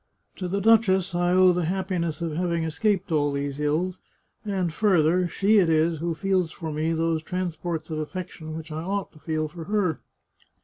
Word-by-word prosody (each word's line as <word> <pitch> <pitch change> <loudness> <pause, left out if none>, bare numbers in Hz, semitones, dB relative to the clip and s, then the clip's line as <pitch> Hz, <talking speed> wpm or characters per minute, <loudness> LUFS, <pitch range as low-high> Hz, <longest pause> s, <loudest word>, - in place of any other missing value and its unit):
To 185 - -3
the 200 +3 -1
duchess 195 -4 +4
I 175 0 +1
owe 185 0 +6
the 175 -1 0
happi 185 +1 -1
ness 165 -1 -2
of 165 - -2
having 170 -1 0
escaped 190 +4 0
all 145 -2 +2
these 140 0 -3
ills, 165 +5 0 0.4
and 190 -6 -1
further, 180 -2 +3
she 200 +5 +3
it 175 -4 +3
is 160 0 +2
who 170 0 -2
feels 185 -1 +1
for 160 0 -6
me 155 +2 -1
those 165 -1 0
transports 170 -2 -4
of 155 - -2
affection 160 -1 -6
which 160 0 -8
I 155 +1 -4
ought 195 +2 -3
to 155 - -18
feel 155 0 -2
for 165 +1 -9
her. 200 -6 0
170 Hz, 190 wpm, -25 LUFS, 160-185 Hz, 0.4 s, owe